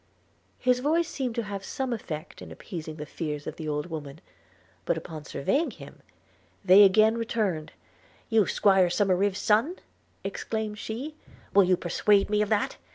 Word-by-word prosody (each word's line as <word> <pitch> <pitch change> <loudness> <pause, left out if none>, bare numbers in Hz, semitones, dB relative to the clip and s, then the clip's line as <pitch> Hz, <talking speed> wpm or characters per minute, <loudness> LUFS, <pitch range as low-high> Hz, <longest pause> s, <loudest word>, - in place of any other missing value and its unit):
His 250 0 +2
voice 320 +5 +1
seemed 255 -7 -3
to 235 - -1
have 200 -1 -6
some 265 +3 -3
effect 165 -7 -6
in - - -10
appeasing 160 -3 -7
the 150 -1 -6
fears 150 -1 -5
of - - -6
the 155 -2 -5
old 150 0 -2
woman; 155 -3 -7 0.6
but 160 - 0
upon 160 -2 -8
surveying 275 - 0
him, - - -12 0.6
they 190 +2 +8
again 215 +3 +5
returned 205 -9 -2 0.3
– - - -31
'You 220 -4 +3
'squire 190 -3 +4
Somerive's 195 +1 +1
son!' 225 - +2 0.5
exclaimed 215 -1 -4
she 245 +9 -5 0.2
– - - -25
'Will 200 -1 +6
you 180 0 +3
persuade 200 +4 +2
me 210 0 +3
of 210 - 0
that? 210 -2 0
200 Hz, 165 wpm, -27 LUFS, 165-225 Hz, 0.6 s, they